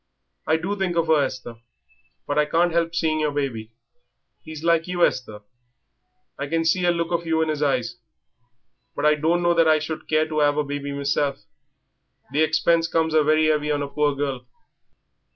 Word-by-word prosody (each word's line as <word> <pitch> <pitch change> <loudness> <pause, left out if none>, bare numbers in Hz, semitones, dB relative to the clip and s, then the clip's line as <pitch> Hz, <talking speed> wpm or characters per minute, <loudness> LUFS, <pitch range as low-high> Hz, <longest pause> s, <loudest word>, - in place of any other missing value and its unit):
"I 160 - +3
do 185 +5 -3
think 190 -3 -2
of 165 - +2
her, 155 -2 +4
Esther. 125 -4 -5 0.7
But 145 +1 0
I 150 - +3
can't 170 +3 +2
help 165 0 0
seeing 160 -1 0
your 155 -1 +1
baby. 130 -7 -3 0.7
He's 155 -1 -9
like 170 0 +2
you, 180 -1 +2
Esther. 110 -5 -4 1.0
I 140 - -3
can 165 +2 -1
see 175 +2 +2
a - - +3
look 170 0 -2
of 170 -1 -2
you 160 0 +1
in 155 - -1
'is 150 -1 -4
eyes. 125 -5 -1 1.0
But 145 - -2
I 150 - +6
don't 165 +4 0
know 175 0 +3
that 165 -1 +3
I 155 0 +5
should 155 +1 -6
care 155 0 +1
to 155 -1 -1
'ave 145 0 +2
a - - +1
baby 145 0 -5
meself 140 0 -1 0.9
the 150 - +1
expense 160 +1 +2
comes 160 -1 0
very 155 0 +3
'eavy 150 -1 +1
on 145 -1 -1
a - - -4
poor 145 0 0
girl." 135 -3 -4
155 Hz, 190 wpm, -23 LUFS, 145-165 Hz, 1.0 s, I